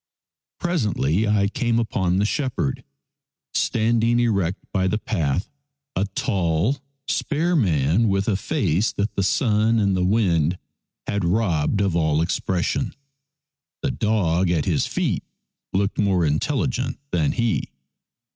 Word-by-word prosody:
Presently 110 - 0
I 105 -1 +3
came 120 +2 0
upon 95 -5 0
the 100 - +2
shepherd 125 - -1 0.7
stand 115 0 +1
ing 120 +1 +3
erect 100 -6 +1 0.2
by 95 -1 +1
the 105 - +1
path, 90 - -1 0.5
a 95 - +1
tall, 95 - 0 0.3
spare 165 +4 0
man 90 - +2
with 95 0 0
a 110 - +2
face 100 - 0
that 100 +1 -2
the - - -1
sun 110 +3 +2
and 100 -3 +2
the 90 - +1
wind 90 -5 +2 0.5
had 100 -1 -1
robbed 90 -1 +1
of 95 -4 +1
all 80 -2 +2
expression. 95 +9 -1 0.9
The 140 - +1
dog 95 -7 +1
at 80 -4 +1
his - - +1
feet - - -1 0.5
looked 100 +2 0
more 95 -5 +2
intelligent 125 - -1
than 80 -5 +1
he. 115 -2 0
100 Hz, 130 wpm, -23 LUFS, 90-115 Hz, 0.9 s, I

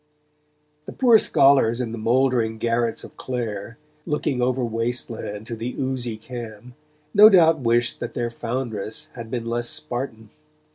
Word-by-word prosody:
The - - -8
poor 240 -4 +5
scholars 135 - +4
in 120 -3 -2
the 115 - -6
mouldering 120 -1 +1
garrets 115 0 -1
of - - -13
Clare, 115 -2 -5 0.3
looking 150 -4 -1
over 125 0 +1
waste 115 +2 -2
land 105 -1 -6
to 120 0 -5
the 115 +3 -5
oozy 130 -4 -3
Cam, 120 0 -9 0.4
no 210 +1 +9
doubt 165 -5 +5
wished 120 -1 +1
that - - -6
their 120 -1 -2
foundress 115 -3 -5
had 115 -2 -8
been 120 -1 -3
less 120 +1 -2
Spartan. 115 -4 -5
120 Hz, 150 wpm, -23 LUFS, 115-130 Hz, 0.4 s, no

